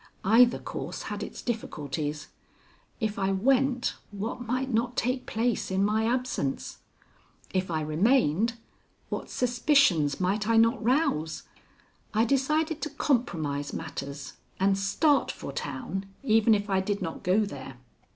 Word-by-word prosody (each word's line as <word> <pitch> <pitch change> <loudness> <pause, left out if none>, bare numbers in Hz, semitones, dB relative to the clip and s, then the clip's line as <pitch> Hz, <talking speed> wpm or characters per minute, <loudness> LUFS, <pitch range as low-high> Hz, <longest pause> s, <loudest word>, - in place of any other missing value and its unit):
Either 235 +4 +6
course - - -6
had - - -5
its - - -7
difficulties. 150 - -3 0.7
If 215 -3 -2
I 195 0 +1
went, 255 +5 +2
what 210 +4 -5
might 255 +2 -2
not 240 +2 0
take 255 +2 -1
place 230 +1 0
in 190 +1 +2
my 220 +2 +1
absence! 245 - -2 0.7
If 185 -1 0
I 160 -2 -1
remained, 200 - +2 0.6
what - - -4
suspicions 245 - +3
might 200 +3 0
I 230 0 +4
not 230 +2 +4
rouse! 215 - +1 0.7
I 220 +2 +4
decided 305 +5 +1
to 305 - -2
compromise 165 - -1
matters, 140 -3 -6 0.3
and 195 +1 +3
start 265 +10 +2
for - - -7
town 145 +8 -4 0.2
even 225 -3 +4
if 205 0 -2
I 195 -2 +2
did 200 +1 -2
not 165 - -5
go 195 +4 +3
there. 135 -8 -8
215 Hz, 135 wpm, -28 LUFS, 170-250 Hz, 0.7 s, Either